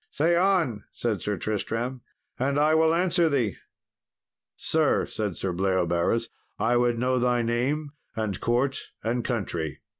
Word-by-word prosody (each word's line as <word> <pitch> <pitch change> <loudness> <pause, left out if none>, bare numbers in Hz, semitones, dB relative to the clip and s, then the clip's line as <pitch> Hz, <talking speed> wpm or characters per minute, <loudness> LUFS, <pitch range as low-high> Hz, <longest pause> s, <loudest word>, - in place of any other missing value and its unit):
"Say 165 +4 +2
on," 170 - +2
said 110 -5 -2
Sir 105 -1 -2
Tristram, 115 +6 -2 0.4
"and 140 +3 +1
I 155 +1 +4
will 160 0 +4
answer 175 0 +3
thee." 125 -9 0 1.0
"Sir," - - +2
said 105 -5 -3
Sir 95 -2 -2
Bleoberis, 95 +4 +1 0.3
"I 120 +2 +2
would 120 -1 +2
know 125 +1 +1
thy 120 -1 +2
name, 135 +6 -1 0.2
and 110 -4 -2
court, 130 +4 +1 0.2
and 120 +2 0
country." 85 - -3
120 Hz, 140 wpm, -26 LUFS, 105-140 Hz, 1.0 s, I